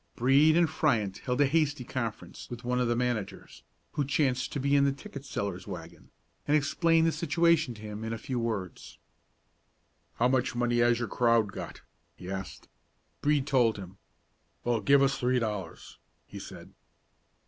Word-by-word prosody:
Brede 140 Hz, +6 st, +4 dB
and 170 Hz, -1 st, +4 dB
Fryant 115 Hz, -, 0 dB
held 125 Hz, +3 st, -1 dB
a -, -, +6 dB
hasty 150 Hz, -2 st, +1 dB
conference 115 Hz, -3 st, -5 dB
with 120 Hz, 0 st, -8 dB
one 125 Hz, +1 st, 0 dB
of 125 Hz, -, +1 dB
the 120 Hz, -, +1 dB
managers, 120 Hz, -4 st, -3 dB, 0.3 s
who 145 Hz, -, -1 dB
chanced 135 Hz, -2 st, 0 dB
to 145 Hz, -, -3 dB
be 140 Hz, +1 st, +2 dB
in 140 Hz, -, +5 dB
the 140 Hz, -, +3 dB
ticket 140 Hz, 0 st, -9 dB
seller's 100 Hz, -8 st, -4 dB
wagon, -, -, -9 dB, 0.4 s
and 150 Hz, +1 st, +4 dB
explained 160 Hz, +3 st, +2 dB
the 165 Hz, -, +3 dB
situation 170 Hz, -6 st, +2 dB
to 105 Hz, -, -12 dB
him 105 Hz, 0 st, -6 dB
in 110 Hz, -, -4 dB
a 115 Hz, -, -3 dB
few 125 Hz, +3 st, -4 dB
words. 110 Hz, -6 st, -4 dB, 1.2 s
"How 120 Hz, -, +2 dB
much 130 Hz, -1 st, 0 dB
money 120 Hz, 0 st, +1 dB
has 120 Hz, 0 st, +4 dB
your 120 Hz, 0 st, -2 dB
crowd 115 Hz, -4 st, +2 dB
got?" -, -, -8 dB, 0.3 s
he 90 Hz, +1 st, -8 dB
asked. 95 Hz, 0 st, -6 dB, 0.5 s
Brede 145 Hz, -2 st, +2 dB
told 120 Hz, -6 st, +2 dB
him. 95 Hz, -1 st, -10 dB, 0.6 s
"Well, 120 Hz, -2 st, 0 dB
give 140 Hz, 0 st, +5 dB
us 135 Hz, 0 st, +1 dB
three 125 Hz, 0 st, +1 dB
dollars," 105 Hz, -7 st, -5 dB, 0.3 s
he -, -, -10 dB
said. -, -, -11 dB
125 Hz, 170 wpm, -29 LUFS, 115-140 Hz, 1.2 s, a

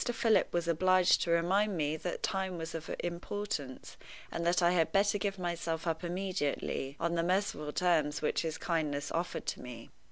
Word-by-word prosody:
Philip 225 Hz, -1 st, +2 dB
was 170 Hz, -1 st, -1 dB
obliged 185 Hz, +2 st, +4 dB
to -, -, -1 dB
remind 185 Hz, +4 st, +2 dB
me 150 Hz, 0 st, 0 dB
that 175 Hz, +3 st, -4 dB
time 190 Hz, -3 st, -1 dB
was 165 Hz, 0 st, -5 dB
of 165 Hz, -1 st, -6 dB
importance, 175 Hz, -5 st, -4 dB, 0.3 s
and 170 Hz, -, -3 dB
that 175 Hz, +1 st, +3 dB
I 175 Hz, -, +5 dB
had 165 Hz, -3 st, +2 dB
better 200 Hz, +2 st, +3 dB
give 195 Hz, -1 st, -1 dB
myself 170 Hz, -2 st, -2 dB
up 165 Hz, 0 st, -1 dB
immediately, 175 Hz, -6 st, -2 dB
on 170 Hz, 0 st, 0 dB
the 170 Hz, -, +1 dB
merciful 175 Hz, -4 st, 0 dB
terms 155 Hz, -4 st, +2 dB
which -, -, 0 dB
his 160 Hz, -1 st, -3 dB
kindness 150 Hz, -4 st, -1 dB
offered 170 Hz, +2 st, -2 dB
to -, -, -3 dB
me. 120 Hz, -2 st, -9 dB
170 Hz, 180 wpm, -32 LUFS, 160-185 Hz, 0.3 s, I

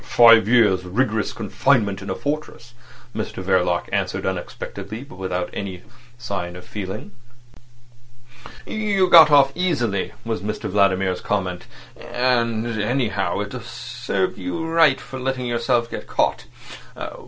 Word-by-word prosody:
"Five 115 Hz, -3 st, +6 dB
years' 105 Hz, -6 st, +4 dB
rigorous 110 Hz, +3 st, 0 dB
confinement 105 Hz, -1 st, +1 dB
in 100 Hz, -, -7 dB
a -, -, -1 dB
fortress," 145 Hz, -5 st, -5 dB, 0.4 s
Mr 110 Hz, -3 st, -4 dB
Verloc 90 Hz, -2 st, +1 dB
answered -, -, -1 dB
unexpectedly, 110 Hz, +4 st, -5 dB
but 140 Hz, -, -14 dB
without 90 Hz, -1 st, -3 dB
any 95 Hz, -3 st, -6 dB, 0.3 s
sign 100 Hz, -7 st, -4 dB
of 90 Hz, -, -10 dB
feeling. 100 Hz, 0 st, -6 dB, 1.5 s
"You 205 Hz, -3 st, +1 dB
got 160 Hz, -2 st, +10 dB
off 140 Hz, -2 st, +6 dB
easily," 125 Hz, -, -1 dB
was 115 Hz, -5 st, -2 dB
Mr 105 Hz, +2 st, -4 dB
Vladimir's 95 Hz, -2 st, +2 dB
comment. -, -, -2 dB, 0.3 s
"And, 120 Hz, -3 st, 0 dB, 0.2 s
anyhow, 120 Hz, +1 st, 0 dB
it -, -, -6 dB
served 95 Hz, 0 st, -3 dB
you 90 Hz, -, -4 dB
right 165 Hz, -4 st, +4 dB
for 130 Hz, -, -8 dB
letting 130 Hz, 0 st, -2 dB
yourself 120 Hz, 0 st, 0 dB
get -, -, -6 dB
caught. -, -, 0 dB
115 Hz, 125 wpm, -22 LUFS, 95-130 Hz, 1.5 s, got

